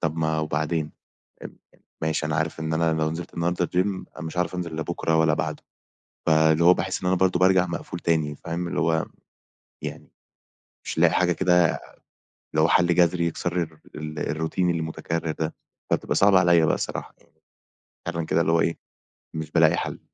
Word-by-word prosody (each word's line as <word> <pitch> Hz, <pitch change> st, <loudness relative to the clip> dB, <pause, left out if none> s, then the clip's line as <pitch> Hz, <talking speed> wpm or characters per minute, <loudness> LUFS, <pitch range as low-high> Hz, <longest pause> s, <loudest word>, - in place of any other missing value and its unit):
طَب 80 Hz, 0 st, -1 dB
ما 80 Hz, -1 st, 0 dB
وبعدين؟ 75 Hz, +1 st, -1 dB, 0.5 s
أب -, -, -9 dB, 0.5 s
ماشي 80 Hz, 0 st, 0 dB
أنا 75 Hz, -1 st, -1 dB
عارف 80 Hz, 0 st, -2 dB
إن 80 Hz, 0 st, -2 dB
أنا 80 Hz, 0 st, +2 dB
لو 80 Hz, 0 st, 0 dB
نزِلت 85 Hz, +2 st, -6 dB
النهاردة 85 Hz, +1 st, 0 dB
الgym 90 Hz, +2 st, +1 dB, 0.3 s
أنا -, -, -6 dB
مش 80 Hz, -, -7 dB
عارف 90 Hz, +1 st, 0 dB
أنزِل 85 Hz, -3 st, -4 dB
لا 80 Hz, -, -1 dB
بُكرة 80 Hz, -1 st, -1 dB
ولا 80 Hz, -1 st, +4 dB
بَعده، -, -, -3 dB, 0.7 s
فاللي 80 Hz, 0 st, +4 dB
هو 90 Hz, -, +8 dB
باحس 95 Hz, +1 st, -3 dB
إن 90 Hz, -, -2 dB
أنا 90 Hz, -, +3 dB
برضه 95 Hz, -1 st, +2 dB
بارجَع 90 Hz, 0 st, +4 dB
مقفول 85 Hz, 0 st, -5 dB
تاني 80 Hz, -3 st, 0 dB
فاهم، 85 Hz, +4 st, -4 dB
اللي -, -, -2 dB
هو 80 Hz, -1 st, +1 dB, 0.8 s
يعني -, -, -7 dB, 0.8 s
مش -, -, -4 dB
لاقي 85 Hz, -1 st, +5 dB
حاجة 90 Hz, -1 st, +3 dB
كده 90 Hz, +1 st, +4 dB, 0.7 s
اللي 80 Hz, -, -4 dB
هو 80 Hz, -, +4 dB
حَل 85 Hz, 0 st, +4 dB
جذري 85 Hz, 0 st, +3 dB
يكسَر 85 Hz, +1 st, -3 dB
الر 80 Hz, -1 st, -8 dB, 0.2 s
الروتين 80 Hz, +3 st, -2 dB
المتكرّر 80 Hz, 0 st, -3 dB
ده 80 Hz, 0 st, -3 dB, 0.4 s
فبتبقى -, -, 0 dB
صعبة 100 Hz, -1 st, +6 dB
عليَّ 85 Hz, -2 st, +4 dB
بقى -, -, +3 dB
الصراحة -, -, -5 dB, 0.9 s
فعلًا 85 Hz, -1 st, -3 dB
كده 85 Hz, -, +1 dB
اللي 80 Hz, -, +1 dB
هو 85 Hz, -, +4 dB
إيه، 85 Hz, -, 0 dB, 0.6 s
مش 80 Hz, -1 st, -5 dB
بالاقي -, -, +4 dB
حَل. -, -, -4 dB
80 Hz, 180 wpm, -25 LUFS, 80-85 Hz, 0.9 s, هو